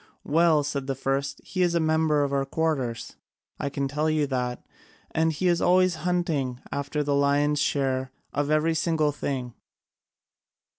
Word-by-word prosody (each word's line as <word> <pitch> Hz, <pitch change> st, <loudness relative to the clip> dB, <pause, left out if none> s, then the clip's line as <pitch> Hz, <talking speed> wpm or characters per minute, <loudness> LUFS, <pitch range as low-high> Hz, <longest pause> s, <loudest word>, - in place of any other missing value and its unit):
"Well," 160 Hz, -1 st, +3 dB
said 140 Hz, -2 st, -3 dB
the 135 Hz, -, -1 dB
first, 135 Hz, +1 st, -2 dB
"he 185 Hz, -, -3 dB
is 175 Hz, -1 st, +2 dB
a -, -, +3 dB
member 160 Hz, -2 st, +2 dB
of 140 Hz, 0 st, -2 dB
our 140 Hz, -1 st, +2 dB
quarters, 135 Hz, -6 st, -2 dB, 0.4 s
I 140 Hz, -, -1 dB
can 140 Hz, 0 st, -2 dB
tell 150 Hz, +3 st, 0 dB
you 155 Hz, -1 st, +2 dB
that, 125 Hz, -3 st, -3 dB, 0.5 s
and 160 Hz, 0 st, +2 dB
he 170 Hz, +4 st, -1 dB
is 175 Hz, -1 st, +2 dB
always 185 Hz, -1 st, +3 dB
hunting 160 Hz, -8 st, -1 dB
after 145 Hz, +1 st, -2 dB
the 145 Hz, 0 st, 0 dB
lion's 145 Hz, +1 st, +2 dB
share 130 Hz, -2 st, 0 dB, 0.2 s
of 145 Hz, 0 st, -1 dB
every 155 Hz, +2 st, +2 dB
single 160 Hz, -2 st, +1 dB
thing." 130 Hz, -4 st, -4 dB
145 Hz, 160 wpm, -26 LUFS, 140-160 Hz, 0.5 s, Well